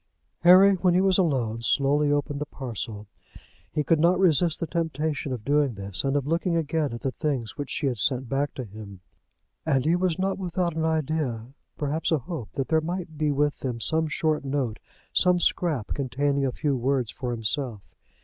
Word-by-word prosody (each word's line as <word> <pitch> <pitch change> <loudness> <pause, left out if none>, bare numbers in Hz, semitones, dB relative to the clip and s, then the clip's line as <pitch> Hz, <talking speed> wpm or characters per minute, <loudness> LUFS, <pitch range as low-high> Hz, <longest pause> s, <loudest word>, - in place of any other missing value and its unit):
Harry, 185 +3 +7
when 180 -1 +2
he - - +5
was 190 0 +3
alone, 125 -10 0
slowly 145 +4 +2
opened 145 0 -1
the - - -1
parcel. 115 -5 -6 0.7
He 150 - 0
could 160 +3 +2
not 170 +3 +4
resist 170 -3 +3
the 165 - -1
temptation 155 -3 -2
of 120 -4 -5
doing 145 -3 +2
this, 100 -1 -3
and 135 0 0
of 140 - -1
looking 170 +3 0
again 160 -2 0
at 120 - -6
the 135 - -1
things 135 -7 -3
which 145 -2 -5
she 150 - -2
had 125 -5 -1
sent 130 +2 +1
back 140 +3 -1
to 130 - -4
him. 100 -3 -10 0.6
And 135 -5 +1
he 165 +2 +3
was 180 -2 0
not 195 +1 -1
without 175 -2 -1
an 160 0 0
idea, 150 -7 -1 0.2
perhaps 150 +3 -1
a 160 - +4
hope 145 - -7
that 135 -2 -3
there 160 -1 +3
might 170 0 -4
be 150 -1 +2
with 145 +1 0
them 125 -3 -3
some 160 +6 +1
short 155 0 0
note, 135 -5 -2 0.3
some 180 -1 +4
scrap 165 - 0
containing 140 +1 0
a - - -1
few 145 +2 -1
words 130 -2 0
for 125 -3 -5
himself. 115 -1 -2
145 Hz, 195 wpm, -26 LUFS, 130-160 Hz, 0.7 s, Harry